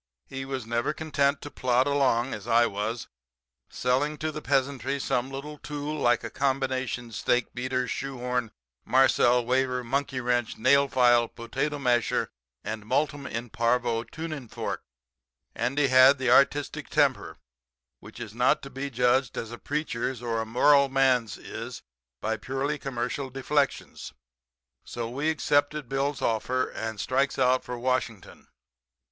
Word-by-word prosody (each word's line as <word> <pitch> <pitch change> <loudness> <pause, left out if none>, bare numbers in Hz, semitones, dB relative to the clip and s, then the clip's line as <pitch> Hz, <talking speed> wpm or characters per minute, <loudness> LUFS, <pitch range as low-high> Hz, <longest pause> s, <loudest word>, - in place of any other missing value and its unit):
He 135 0 -6
was 135 -3 -4
never 120 +5 -1
content 145 -2 0
to 145 - -7
plod 125 0 +2
along, 135 -3 +1
as 105 +1 -7
I 120 0 +5
was, 110 +2 -3 0.6
selling 140 +5 0
to 155 +1 -2
the 155 - -6
peasantry 135 -1 0
some 125 -1 -1
little 145 +2 -7
tool 150 0 -5
like 120 -6 +2
a - - -5
combination 130 -3 -1
steak 120 +3 0
beater, 125 0 -2
shoe 135 -1 -4
horn, 125 -1 -2 0.3
marcel 125 -2 +4
waver, 125 0 +1
monkey 135 +2 -1
wrench, 120 -2 0
nail 140 +4 +4
file, 120 -3 +4
potato 135 +7 -3
masher 125 -4 +1 0.3
and 110 -1 -5
Multum 140 +4 -1
in 115 -1 -5
Parvo 115 -1 +1
tuning 155 -3 -7
fork. - - -4 0.7
Andy 135 +5 0
had 130 +2 +7
the 130 -2 +1
artistic 140 +2 +3
temper, - - +1 0.6
which - - -12
is 115 -3 -7
not 125 +2 +2
to 135 - -8
be 135 +2 -4
judged 125 +1 +1
as 115 - -4
a 120 - -8
preacher's 130 -4 -2
or 115 -1 -2
a 110 - -5
moral 140 +4 +4
man's 130 -6 +2
is - - -8 0.4
by 110 +6 -1
purely 135 +6 -2
commercial 130 +1 -3
deflections. 135 +2 -2 0.7
So 120 -1 -5
we 140 +6 -1
accepted 145 -2 +1
Bill's 135 +2 -1
offer, 125 +3 0
and 110 -1 -5
strikes 135 +5 0
out 130 0 +3
for 125 0 -5
Washington. 120 -4 -3
130 Hz, 145 wpm, -27 LUFS, 120-140 Hz, 0.7 s, had